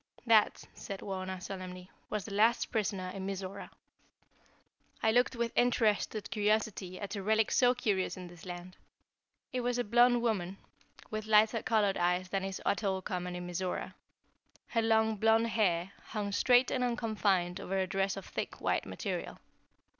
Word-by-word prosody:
"That," 225 Hz, -3 st, +4 dB
said 195 Hz, -1 st, -7 dB
Wauna, 190 Hz, -1 st, -4 dB
solemnly, 185 Hz, -1 st, -7 dB, 0.2 s
"was 210 Hz, -3 st, -3 dB
the 205 Hz, -, -7 dB
last 230 Hz, +3 st, +3 dB
prisoner 195 Hz, -4 st, -1 dB
in 190 Hz, -1 st, -5 dB
Mizora." 195 Hz, 0 st, -5 dB, 1.3 s
I 220 Hz, -, +4 dB
looked 245 Hz, +2 st, +3 dB
with 235 Hz, -1 st, -1 dB
interested 220 Hz, -3 st, +1 dB
curiosity 210 Hz, -3 st, 0 dB
at 200 Hz, 0 st, -5 dB
a 200 Hz, -, -3 dB
relic 220 Hz, +2 st, +2 dB
so 250 Hz, 0 st, +4 dB
curious 195 Hz, -7 st, -1 dB
in 185 Hz, -, -7 dB
this 175 Hz, -1 st, -13 dB
land. 180 Hz, 0 st, -8 dB, 0.8 s
It 250 Hz, -, 0 dB
was 245 Hz, 0 st, 0 dB
a 245 Hz, -, +1 dB
blonde 240 Hz, +2 st, +4 dB
woman 195 Hz, -5 st, -1 dB, 0.5 s
with 215 Hz, 0 st, -4 dB
lighter 220 Hz, +1 st, +4 dB
colored 210 Hz, -3 st, +2 dB
eyes 180 Hz, +1 st, +1 dB
than 195 Hz, 0 st, -1 dB
is 195 Hz, -1 st, -4 dB
at 200 Hz, -, +1 dB
all 190 Hz, -2 st, 0 dB
common 180 Hz, -1 st, -3 dB
in 180 Hz, 0 st, -5 dB
Mizora. 180 Hz, +1 st, -3 dB, 0.8 s
Her 230 Hz, -, +1 dB
long, 220 Hz, -1 st, +2 dB
blonde 225 Hz, +2 st, +3 dB
hair 190 Hz, -5 st, +1 dB
hung 210 Hz, -2 st, -3 dB
straight 245 Hz, +5 st, +4 dB
and 255 Hz, -, 0 dB
unconfined 210 Hz, -7 st, 0 dB
over 195 Hz, -, -2 dB
a 190 Hz, -, +1 dB
dress 195 Hz, +1 st, -1 dB
of 195 Hz, -, -7 dB
thick, -, -, -5 dB
white -, -, 0 dB
material. -, -, -4 dB
205 Hz, 160 wpm, -32 LUFS, 185-225 Hz, 1.3 s, That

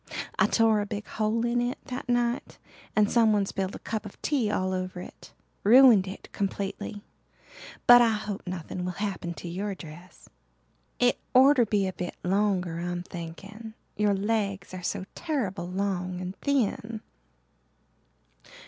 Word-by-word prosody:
I -, -, +5 dB
tore 225 Hz, -2 st, +3 dB
a 205 Hz, -, -4 dB
big 210 Hz, 0 st, -5 dB
hole 220 Hz, +2 st, -1 dB
in 240 Hz, 0 st, +1 dB
it 245 Hz, +1 st, -1 dB
that 255 Hz, -2 st, -6 dB
night 240 Hz, +1 st, 0 dB, 0.4 s
and 210 Hz, -1 st, +4 dB
someone 215 Hz, -3 st, +3 dB
spilled 195 Hz, 0 st, -3 dB
a -, -, -12 dB
cup 220 Hz, -1 st, -2 dB
of 205 Hz, -, -11 dB
tea 265 Hz, -8 st, +1 dB
all 185 Hz, -2 st, 0 dB
over 185 Hz, -1 st, -3 dB
it. -, -, -11 dB, 0.3 s
Ruined 230 Hz, -3 st, +7 dB
it 190 Hz, -, -8 dB
completely. 200 Hz, +1 st, -3 dB, 0.8 s
But 245 Hz, 0 st, +9 dB
I 235 Hz, -, +5 dB
hope 210 Hz, -2 st, -3 dB
nothing 180 Hz, 0 st, -5 dB
will 180 Hz, 0 st, -2 dB
happen 190 Hz, -4 st, -3 dB
to 175 Hz, -, -8 dB
your 195 Hz, +4 st, -3 dB
dress. 175 Hz, +2 st, -12 dB, 0.7 s
It 245 Hz, 0 st, +3 dB, 0.2 s
orter 260 Hz, -1 st, +7 dB
to -, -, -20 dB
be 205 Hz, -2 st, +2 dB
a 185 Hz, -, -2 dB
bit 180 Hz, -1 st, -5 dB
longer 185 Hz, -3 st, +1 dB
I'm 175 Hz, 0 st, -3 dB
thinking 195 Hz, +7 st, -9 dB, 0.2 s
your 205 Hz, -1 st, +2 dB
legs 200 Hz, -2 st, -1 dB
are 185 Hz, -, -6 dB
so 190 Hz, +2 st, -3 dB
terrible 215 Hz, -, -2 dB
long 185 Hz, -1 st, -2 dB
and 185 Hz, +1 st, -5 dB
thin." 230 Hz, -5 st, -1 dB
205 Hz, 155 wpm, -27 LUFS, 185-225 Hz, 0.8 s, But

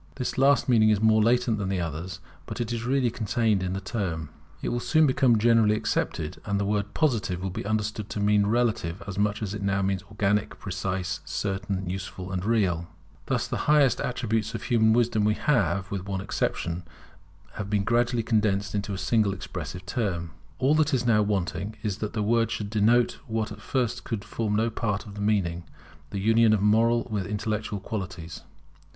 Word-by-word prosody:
This 125 Hz, -3 st, -3 dB
last 140 Hz, +1 st, +4 dB
meaning 110 Hz, -4 st, +5 dB
is 105 Hz, -2 st, +3 dB
more 110 Hz, 0 st, +4 dB
latent 115 Hz, 0 st, +2 dB
than 95 Hz, -2 st, -2 dB
the 95 Hz, -1 st, 0 dB
others, 85 Hz, +1 st, -5 dB, 0.3 s
but -, -, -6 dB
is 120 Hz, 0 st, -2 dB
really 130 Hz, -2 st, +2 dB
contained 110 Hz, -2 st, +1 dB
in 95 Hz, 0 st, -2 dB
the 95 Hz, -, -2 dB
term. 90 Hz, -6 st, -3 dB, 0.3 s
It -, -, 0 dB
will 120 Hz, -, -1 dB
soon 155 Hz, +5 st, +3 dB
become 130 Hz, -4 st, +4 dB
generally 110 Hz, -1 st, +4 dB
accepted, 80 Hz, -6 st, -2 dB
and 100 Hz, -1 st, -1 dB
the 100 Hz, -, 0 dB
word 100 Hz, 0 st, -1 dB
Positive 115 Hz, -, +1 dB
will 95 Hz, -, -2 dB
be 95 Hz, -, -5 dB
understood 105 Hz, -1 st, -2 dB
to -, -, -4 dB
mean 105 Hz, 0 st, +3 dB
relative 110 Hz, -6 st, 0 dB
as 100 Hz, -1 st, -5 dB
much 105 Hz, +1 st, 0 dB
as 100 Hz, -1 st, -3 dB
it 105 Hz, -, -5 dB
now 100 Hz, 0 st, +1 dB
means 95 Hz, -1 st, 0 dB
organic, 105 Hz, 0 st, 0 dB
precise, 95 Hz, -2 st, -3 dB
certain, 95 Hz, -1 st, -3 dB
useful, 95 Hz, 0 st, -5 dB
and 95 Hz, -1 st, -2 dB
real. 95 Hz, -7 st, +1 dB, 0.4 s
Thus -, -, 0 dB
the -, -, -3 dB
highest 145 Hz, -4 st, +5 dB
attributes 115 Hz, -3 st, -1 dB
of -, -, -5 dB
human 110 Hz, -2 st, +3 dB
wisdom 110 Hz, -2 st, +2 dB
have, 105 Hz, -4 st, +1 dB
with 100 Hz, -1 st, -4 dB
one 95 Hz, -1 st, -2 dB
exception, 90 Hz, -3 st, -2 dB, 0.9 s
been 105 Hz, -1 st, +1 dB
gradually 120 Hz, +1 st, +1 dB
condensed 105 Hz, -3 st, +1 dB
into 100 Hz, -1 st, -2 dB
a -, -, -4 dB
single 105 Hz, -1 st, +2 dB
expressive 90 Hz, -1 st, -6 dB
term. 85 Hz, -5 st, -2 dB, 0.3 s
All 135 Hz, +3 st, +3 dB
that 155 Hz, -2 st, +3 dB
is 120 Hz, -1 st, -1 dB
now 110 Hz, -3 st, +4 dB
wanting 100 Hz, 0 st, -1 dB
is 105 Hz, -1 st, -2 dB
that 105 Hz, -, -3 dB
the 110 Hz, -2 st, -1 dB
word 115 Hz, +1 st, +2 dB
should 105 Hz, -3 st, -4 dB
denote 115 Hz, +3 st, +3 dB
what 110 Hz, -1 st, -2 dB
at -, -, -9 dB
first 125 Hz, -4 st, -1 dB
could 105 Hz, -3 st, -4 dB
form 105 Hz, 0 st, -2 dB
no 115 Hz, +2 st, +1 dB
part 105 Hz, -2 st, -2 dB
of 105 Hz, -, -10 dB
the 105 Hz, -, -7 dB
meaning, 95 Hz, -5 st, 0 dB, 0.5 s
the -, -, -5 dB
union 110 Hz, +2 st, +4 dB
of 105 Hz, -, +2 dB
moral 115 Hz, +3 st, +4 dB
with 100 Hz, -4 st, -1 dB
intellectual 105 Hz, 0 st, -2 dB
qualities. 95 Hz, -5 st, -6 dB
105 Hz, 190 wpm, -26 LUFS, 95-115 Hz, 0.9 s, meaning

